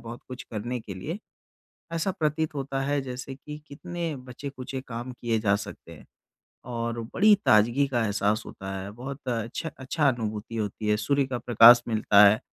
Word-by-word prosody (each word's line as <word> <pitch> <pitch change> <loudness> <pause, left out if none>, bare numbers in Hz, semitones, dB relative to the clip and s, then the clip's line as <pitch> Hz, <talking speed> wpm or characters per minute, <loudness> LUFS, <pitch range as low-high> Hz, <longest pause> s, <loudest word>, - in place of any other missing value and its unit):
बहुत 115 +1 -8
कुछ 125 0 -7
करने 120 +3 -3
के 100 -3 -8
लिए। 155 - -5 0.8
ऐसा 165 +4 0
प्रतीत 155 -2 -1
होता 135 -1 -2
है 145 +1 0
जैसे 130 +1 -6
कि 150 +2 -9
कितने 170 +1 -5
बचे-खुचे 130 +1 -7
काम 120 +1 -5
किए 120 -2 -1
जा 105 -2 +3
सकते 100 - -8
हैं - - -13 0.7
और 115 0 -2
बड़ी 210 +2 +6
ताजगी 120 +6 +4
का 120 -3 0
एहसास 105 +1 0
होता 95 0 -7
है। 95 +1 -6
बहुत 130 +4 -8
अच्छा 115 +6 -3
अच्छी 130 +5 -5
अनुभूति 115 -4 0
होती 105 0 -3
है। 105 - +3
सूर्य 140 +6 +1
का 125 -2 -2
प्रकाश 120 +1 +8
मिलता 105 -2 +5
है, 105 +2 +4
125 Hz, 170 wpm, -27 LUFS, 110-140 Hz, 0.8 s, प्रकाश